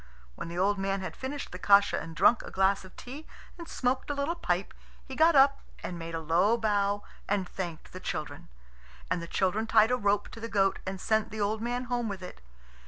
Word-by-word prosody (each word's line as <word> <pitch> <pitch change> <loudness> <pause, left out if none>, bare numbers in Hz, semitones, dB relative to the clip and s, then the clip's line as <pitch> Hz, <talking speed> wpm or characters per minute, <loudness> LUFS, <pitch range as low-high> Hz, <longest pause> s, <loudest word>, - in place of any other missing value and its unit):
When - - -7
the 170 +1 -6
old 200 +2 +2
man 195 0 -1
had 185 - -5
finished 280 +2 -5
the 180 - -7
kasha 200 +1 +5
and 165 0 -8
drunk 205 +6 +5
a - - -9
glass 195 +1 +2
of 185 - -14
tea 280 +6 -9 0.3
and 335 - -7
smoked 260 -1 -1
a 290 - -1
little 280 +4 0
pipe, 190 - -2 0.3
he 265 - -8
got 320 +2 +5
up 275 0 +6 0.2
and 175 -2 -5
made 165 0 -5
a - - -2
low 175 +8 +3
bow 205 -2 +1 0.3
and 195 -2 +1
thanked 175 -4 -6
the - - -7
children. - - -5 0.6
And 175 - +1
the 170 - -6
children 200 +6 0
tied 220 +1 +5
a 250 - +3
rope 205 -2 +1
to - - -10
the 230 0 -5
goat 195 -3 +2
and 190 0 -3
sent 220 +2 +1
the 215 - -7
old 210 +2 0
man 245 +2 -2
home 240 -2 -2
with 190 -2 -6
it. 180 - -9
205 Hz, 225 wpm, -29 LUFS, 190-245 Hz, 0.6 s, up